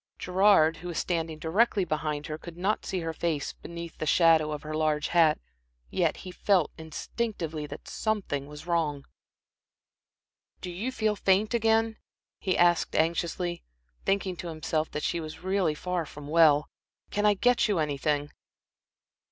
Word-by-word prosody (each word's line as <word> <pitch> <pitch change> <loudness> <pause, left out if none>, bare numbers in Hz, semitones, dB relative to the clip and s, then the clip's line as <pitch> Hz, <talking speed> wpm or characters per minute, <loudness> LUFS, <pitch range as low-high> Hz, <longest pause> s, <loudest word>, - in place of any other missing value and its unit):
Gerard, 185 -4 +4
who 175 - -8
was 170 -3 -4
standing 165 -3 -1
directly 195 +5 +2
behind 150 -2 -2
her, 155 0 -5
could 170 0 -10
not 195 +4 -1
see 185 - -2
her 165 0 -3
face 160 -3 -2
beneath 170 0 -9
the 155 - -2
shadow 160 -2 +5
of 150 -1 -5
her 155 0 -5
large 155 -1 0
hat, 165 -3 +4 0.5
yet - - +1
he 185 - -6
felt 180 -3 +2
instinctively 160 -1 -4
that - - -10
something 195 -11 -2
was 150 +2 -10
wrong. 155 -5 -1 1.5
"Do 180 - -6
you 210 +9 -3
feel 220 -4 0
faint 200 +3 +2
again?" 225 -1 +2 0.4
he 185 -2 0
asked, 175 -1 +3
anxiously, 170 +2 0 0.4
thinking 195 -2 0
to 175 - -6
himself 155 -1 -2
that 150 - -4
she 170 - 0
was 155 +1 -8
really 190 -4 +1
far 180 0 -2
from 145 0 -10
well. 150 -2 +5 0.4
"Can 205 +1 +2
I 205 - +4
get 245 +5 +3
you 205 -3 +1
anything?" 145 -1 0
170 Hz, 155 wpm, -28 LUFS, 155-190 Hz, 1.5 s, shadow